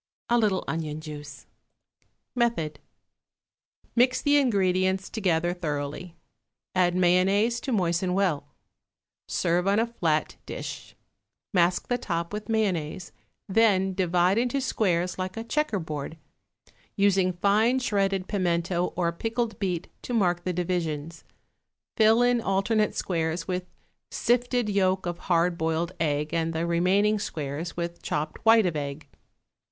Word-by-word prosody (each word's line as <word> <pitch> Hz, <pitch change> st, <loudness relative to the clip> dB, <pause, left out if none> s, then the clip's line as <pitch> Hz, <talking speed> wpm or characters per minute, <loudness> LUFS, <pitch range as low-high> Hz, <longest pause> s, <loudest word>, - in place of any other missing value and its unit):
A 240 Hz, -, +4 dB
little 205 Hz, -4 st, +1 dB
onion 155 Hz, -2 st, -3 dB
juice. 150 Hz, -2 st, -9 dB, 0.9 s
Method. 235 Hz, -11 st, 0 dB, 1.2 s
Mix 250 Hz, +1 st, +4 dB
the 290 Hz, 0 st, +3 dB
ingredients 190 Hz, -6 st, +1 dB
together 175 Hz, -5 st, +1 dB
thoroughly; 155 Hz, 0 st, -4 dB, 0.6 s
add 180 Hz, -1 st, +2 dB
mayonnaise 190 Hz, +6 st, +3 dB
to 265 Hz, -, -4 dB
moisten 180 Hz, -3 st, +1 dB
well. 175 Hz, -8 st, 0 dB, 0.8 s
Serve 175 Hz, +2 st, 0 dB
on 200 Hz, +1 st, +3 dB
a 225 Hz, -, +3 dB
flat 165 Hz, -10 st, -1 dB
dish. -, -, -7 dB, 0.6 s
Mask 175 Hz, -1 st, +2 dB
the 245 Hz, 0 st, 0 dB
top 170 Hz, -5 st, -3 dB
with 210 Hz, +1 st, -5 dB
mayonnaise, 190 Hz, -, -1 dB, 0.4 s
then 195 Hz, -2 st, +3 dB
divide 180 Hz, +2 st, +2 dB
into 250 Hz, +3 st, 0 dB
squares 185 Hz, -9 st, 0 dB
like 185 Hz, +1 st, -4 dB
a 225 Hz, -, -3 dB
checker 300 Hz, -2 st, 0 dB
board, 155 Hz, -2 st, -5 dB, 0.8 s
using 195 Hz, -2 st, +3 dB
fine 210 Hz, +7 st, +3 dB
shredded 195 Hz, -6 st, 0 dB
pimento 175 Hz, -2 st, 0 dB
or 170 Hz, -2 st, +1 dB
pickled 225 Hz, +4 st, -3 dB
beet 180 Hz, -3 st, -2 dB
to 245 Hz, -, -4 dB
mark 175 Hz, -5 st, +1 dB
the 185 Hz, -, 0 dB
divisions; 165 Hz, -3 st, -3 dB, 0.7 s
fill 225 Hz, +2 st, +5 dB
in 245 Hz, -1 st, +3 dB
alternate 210 Hz, +2 st, +1 dB
squares 165 Hz, -1 st, -2 dB
with 180 Hz, -1 st, -3 dB, 0.4 s
sifted 245 Hz, -1 st, +1 dB
yolk 190 Hz, -2 st, +1 dB
of 175 Hz, -1 st, -3 dB
hard 170 Hz, 0 st, +2 dB
boiled 160 Hz, +2 st, 0 dB
egg 150 Hz, -1 st, -1 dB
and 165 Hz, 0 st, 0 dB
the 160 Hz, +1 st, -1 dB
remaining 190 Hz, +5 st, +2 dB
squares 155 Hz, -2 st, -4 dB
with 170 Hz, 0 st, -4 dB
chopped 150 Hz, +1 st, -3 dB
white 225 Hz, -2 st, +6 dB
of 175 Hz, -3 st, 0 dB
egg. 145 Hz, 0 st, -5 dB
185 Hz, 130 wpm, -26 LUFS, 170-210 Hz, 1.2 s, white